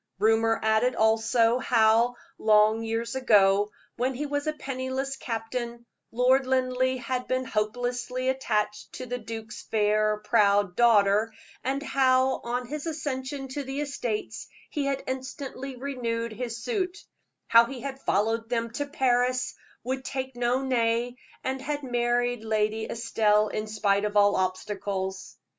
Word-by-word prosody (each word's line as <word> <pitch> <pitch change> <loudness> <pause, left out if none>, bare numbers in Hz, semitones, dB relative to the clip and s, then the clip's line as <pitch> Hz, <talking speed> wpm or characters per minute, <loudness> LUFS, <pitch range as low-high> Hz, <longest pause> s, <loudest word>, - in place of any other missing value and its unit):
Rumor 225 +2 +3
added 220 +3 +2
also, 225 +2 +3
how, 230 0 +3 0.2
long 215 +1 +4
years 225 +1 -2
ago, 205 -5 +4 0.3
when 255 +2 0
he 295 +4 -3
was 290 +1 -2
a 310 - +1
penniless 270 -1 -3
captain, 235 0 -4 0.3
Lord 255 +3 +3
Linleigh 260 0 +1
had 255 0 -3
been 255 0 0
hopelessly 245 +3 -2
attached 220 -6 -1
to 255 - -6
the 245 0 -4
duke's 220 -1 -7
fair, 215 0 +1
proud 205 -2 +2
daughter, 215 -2 +4 0.3
and 275 +3 -1
how, 260 -2 +2
on 245 +1 -2
his 300 +5 -5
accession 275 -3 -4
to 285 +2 -4
the 270 +1 -4
estates, 250 -7 -4 0.2
he 290 -3 -1
had 275 -1 -1
instantly 260 0 -5
renewed 235 -4 -3
his 235 0 -4
suit; 380 -5 -1 0.5
how 230 0 +6
he 255 0 -7
had 270 +1 -6
followed 225 +2 0
them 230 -1 -1
to 285 +5 -3
Paris, 255 -2 +1 0.3
would 260 +2 -3
take 265 -1 -4
no 245 +2 +1
nay, 240 -1 +1 0.3
and 265 0 -2
had 290 +1 -3
married 245 -1 0
Lady 220 0 0
Estelle 215 -2 +2
in 215 0 -3
spite 205 -2 +1
of 210 0 -1
all 205 0 +5
obstacles. 190 0 -3
240 Hz, 140 wpm, -27 LUFS, 220-260 Hz, 0.5 s, how